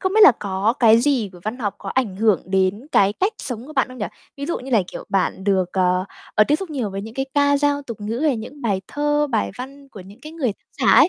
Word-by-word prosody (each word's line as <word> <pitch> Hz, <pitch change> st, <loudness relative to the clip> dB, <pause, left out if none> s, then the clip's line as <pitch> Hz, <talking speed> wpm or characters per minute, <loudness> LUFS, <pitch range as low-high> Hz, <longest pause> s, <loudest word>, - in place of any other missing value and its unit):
Không 375 Hz, -1 st, 0 dB
biết 435 Hz, -, +5 dB
là 285 Hz, -, +10 dB
có 200 Hz, +3 st, 0 dB
cái 225 Hz, -1 st, +7 dB
gì 250 Hz, -6 st, +1 dB
của 175 Hz, -, -13 dB
văn 225 Hz, +4 st, -3 dB
học 205 Hz, -4 st, -2 dB
có 195 Hz, -, -8 dB
ảnh 220 Hz, -7 st, 0 dB
hưởng 215 Hz, -5 st, +3 dB
đến 190 Hz, +5 st, 0 dB
cái 200 Hz, +1 st, +4 dB
cách 385 Hz, -, 0 dB
sống 245 Hz, 0 st, -4 dB
của 310 Hz, -, -10 dB
bạn 265 Hz, -3 st, +1 dB
không 255 Hz, -1 st, -11 dB
nhỉ? 210 Hz, -, -1 dB, 0.3 s
Ví 280 Hz, +1 st, -5 dB
dụ 340 Hz, -, -1 dB
như 260 Hz, +1 st, -9 dB
là, 220 Hz, -5 st, +4 dB
kiểu, -, -, -8 dB
bạn 195 Hz, -1 st, 0 dB
được, 190 Hz, -3 st, +1 dB
ờ, 180 Hz, -1 st, +2 dB, 0.3 s
ờ, 215 Hz, -, +6 dB
tiếp 295 Hz, -, +4 dB
xúc 370 Hz, 0 st, -7 dB
nhiều 255 Hz, -9 st, -2 dB
với 195 Hz, +1 st, -5 dB
những 225 Hz, +2 st, -9 dB
cái 270 Hz, 0 st, -2 dB
ca 285 Hz, 0 st, +4 dB
dao 285 Hz, 0 st, +1 dB
tục 230 Hz, -6 st, -8 dB
ngữ 220 Hz, +3 st, -3 dB
hay 295 Hz, -5 st, +2 dB
những 275 Hz, +6 st, -9 dB
bài 200 Hz, -5 st, 0 dB
thơ, 295 Hz, 0 st, +1 dB
bài 220 Hz, -3 st, 0 dB
văn 275 Hz, +2 st, -9 dB
của 210 Hz, -, -11 dB
những 200 Hz, +6 st, -14 dB
cái 305 Hz, +3 st, -10 dB
người 270 Hz, -10 st, -1 dB
tác -, -, -32 dB, 0.2 s
giả -, -, +6 dB
ấy. -, -, +7 dB
230 Hz, 280 wpm, -21 LUFS, 200-285 Hz, 0.3 s, là